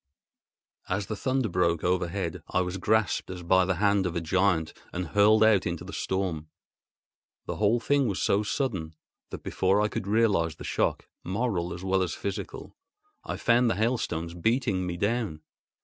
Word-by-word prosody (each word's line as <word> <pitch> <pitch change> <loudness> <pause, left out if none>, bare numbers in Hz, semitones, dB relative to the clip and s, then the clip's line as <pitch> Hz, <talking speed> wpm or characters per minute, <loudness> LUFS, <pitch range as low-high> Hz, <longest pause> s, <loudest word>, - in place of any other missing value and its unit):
As 95 +2 -1
the 110 - -4
thunder 130 +3 0
broke 85 -3 +1
overhead, 90 -1 -1
I 90 - +1
was 90 +1 -3
grasped 110 +2 +1
as 90 -1 -6
by 95 +2 +4
the 90 0 0
hand 100 0 +2
of 85 - -5
a - - +1
giant 85 -1 +1 0.2
and 90 -2 -4
hurled 105 +4 +5
out 110 -3 +4
into 85 -1 -3
the - - -8
storm. 90 -5 -2 1.0
The - - -4
whole 110 +3 +3
thing 140 +4 +2
was 100 -3 -2
so 100 - +2
sudden 100 - -2 0.3
that, - - -8
before 95 +2 +1
I 105 0 +2
could 100 - -4
realise 100 -7 +2
the - - -10
shock, - - -1 0.2
moral 95 -3 -1
as 90 - -6
well 95 0 +1
as 90 -3 -1
physical, 100 -1 -6 0.5
I - - -4
found 120 0 +3
the 110 - +1
hailstones 100 -7 -1
beating 100 0 0
me 85 -1 -3
down. 100 -6 -1
95 Hz, 175 wpm, -27 LUFS, 90-110 Hz, 1.0 s, hurled